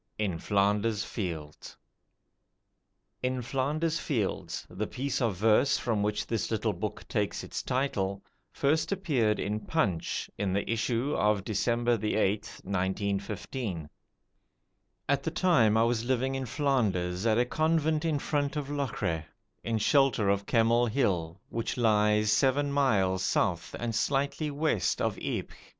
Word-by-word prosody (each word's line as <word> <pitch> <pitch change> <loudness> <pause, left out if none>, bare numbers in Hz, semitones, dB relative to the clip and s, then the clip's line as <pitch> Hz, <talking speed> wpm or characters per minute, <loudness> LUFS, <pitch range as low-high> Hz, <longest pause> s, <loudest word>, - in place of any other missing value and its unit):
In 95 -6 -1
Flanders 105 +2 +1
Fields 80 -10 -6 1.4
"In 125 0 -1
Flanders 150 +6 -1
Fields", 115 - -2
the 105 +2 -4
piece 135 +1 -2
of 115 -5 +1
verse 110 +8 +3
from 110 -4 -1
which 105 0 -1
this 115 -2 -2
little 110 -1 0
book 100 +4 -5
takes 105 -3 -1
its - - -4
title, 100 -7 -1 0.3
first 155 +6 +1
appeared 140 - +1
in 105 +2 -1
'Punch' 100 - -1
in 100 -2 0
the 100 +1 -1
issue 115 +4 0
of 105 -2 +2
December 120 +2 +1
8th, 105 -1 -1
1915. 100 - -2 1.2
At 140 0 +2
the 150 - -2
time 155 - +3
I 110 - +5
was 115 -1 +1
living 130 +1 0
in 135 -1 -3
Flanders 105 - 0
at 110 -1 +3
a 120 - +3
convent 155 +2 +1
in 160 -3 +1
front 145 0 -1
of 145 -1 -3
Locre, 125 - -2 0.4
in 115 -1 0
shelter 120 -2 +3
of 100 0 0
Kemmel 115 +1 +3
Hill, 95 -8 0
which 115 +2 -3
lies 105 -2 +3
seven 140 +3 +2
miles 100 -10 +2
south 90 -2 0
and 120 -1 -3
slightly 140 +6 0
west 145 - 0
of - - -1
Ypres. - - -4
115 Hz, 135 wpm, -29 LUFS, 100-135 Hz, 1.4 s, I